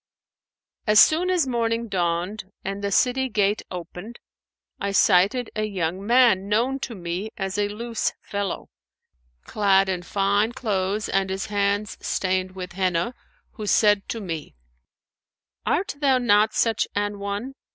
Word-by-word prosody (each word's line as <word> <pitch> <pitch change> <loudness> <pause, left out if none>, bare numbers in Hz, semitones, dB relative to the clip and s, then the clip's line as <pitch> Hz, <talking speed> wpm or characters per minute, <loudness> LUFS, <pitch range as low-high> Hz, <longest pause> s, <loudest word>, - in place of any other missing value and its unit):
As 210 0 +6
soon 340 +4 +5
as 360 -5 +2
morning 230 -2 -1
dawned 180 +1 -1 0.2
and 195 +1 -4
the 200 - -1
city 255 +5 +2
gate 205 -2 +1
opened, 180 +5 -8 0.6
I 200 0 -2
sighted 200 +6 +3
a 215 0 0
young 185 -2 -3
man 230 -6 +4
known 245 +6 +1
to 240 -3 -5
me 180 +3 -4
as 195 -1 -3
a 205 - +2
loose 230 +2 -2
fellow, 200 -2 -4 0.7
clad 195 -2 +2
in 180 -2 -1
fine 200 +4 +1
clothes 210 -4 -1
and 195 0 0
his 190 +1 -3
hands 200 +1 0
stained 185 0 -1
with 180 -1 -6
Henna, 185 +3 0 0.4
who 215 -2 -7
said 205 -1 +3
to 230 - -3
me, 165 - -6 1.1
'Art 390 -4 0
thou 275 -3 +3
not 215 -3 +3
such 225 -2 +1
an 205 0 -1
one?' 200 +6 -4
205 Hz, 140 wpm, -24 LUFS, 190-230 Hz, 1.1 s, As